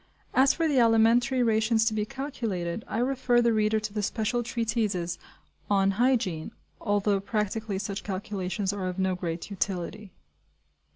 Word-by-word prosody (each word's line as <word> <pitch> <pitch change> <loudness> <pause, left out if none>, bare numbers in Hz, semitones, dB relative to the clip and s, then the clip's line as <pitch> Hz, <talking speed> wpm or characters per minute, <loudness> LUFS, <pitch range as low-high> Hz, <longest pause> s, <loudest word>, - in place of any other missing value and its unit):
As 265 +1 +5
for 330 +3 0
the 285 -4 +3
alimentary 235 +3 +4
rations 220 0 +2
to 225 - +1
be 210 -1 0
calculated, 225 -9 -4
I - - -3
refer 250 0 +2
the 235 -1 +3
reader 215 0 +2
to 210 -1 -5
the 210 - -1
special 225 +3 -1
treatises 225 -7 -1 0.5
on 195 -1 +3
hygiene: 205 -8 0 0.3
although 205 -1 +1
practically 210 0 -2
such 200 0 -4
calculations 190 -1 -3
are 195 -2 -3
of 180 0 -4
no 190 -1 +1
great 175 +1 -4
utility. 195 +1 -3
215 Hz, 150 wpm, -27 LUFS, 195-235 Hz, 0.5 s, As